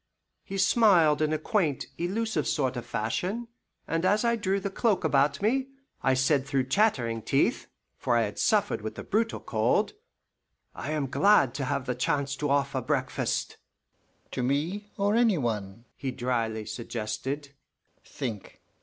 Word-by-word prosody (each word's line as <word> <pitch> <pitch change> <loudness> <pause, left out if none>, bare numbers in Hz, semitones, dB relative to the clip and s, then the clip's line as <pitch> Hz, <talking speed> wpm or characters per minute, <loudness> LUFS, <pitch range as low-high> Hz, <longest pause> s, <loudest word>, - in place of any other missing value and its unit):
He 195 - -6
smiled 185 -7 +4
in 155 0 +2
a 155 - +1
quaint, 155 - 0
elusive 185 - -1
sort 130 -1 0
of 120 - -6
fashion, 180 - -2 0.4
and 165 +1 -1
as 210 +5 +3
I 235 0 +3
drew 200 -3 0
the 195 0 -4
cloak 210 -1 +1
about 145 +3 +2
me, 260 +5 +2 0.3
I 135 -1 +3
said 135 +1 +2
through 135 -2 0
chattering 130 - +2
teeth, - - +1 0.3
for 120 - +2
I 115 - +3
had 105 -1 -4
suffered 205 - +2
with 110 +1 -5
the - - -6
brutal 225 +2 0
cold, - - +1 0.8
"I - - -6
am 155 -2 0
glad 165 - +4
to 135 - -3
have 140 0 -1
the 125 - -1
chance 140 +2 -1
to 145 - -1
offer 140 -1 +1
breakfast." 130 -1 -1 0.7
"To - - -2
me 160 +11 -1
or 200 +1 +2
any 230 -5 +4
one?" 115 -4 -3
he 135 - -4
dryly 115 -4 -2
suggested. 120 +6 -4 0.5
"Think! 115 -8 -6
145 Hz, 155 wpm, -28 LUFS, 125-195 Hz, 0.8 s, smiled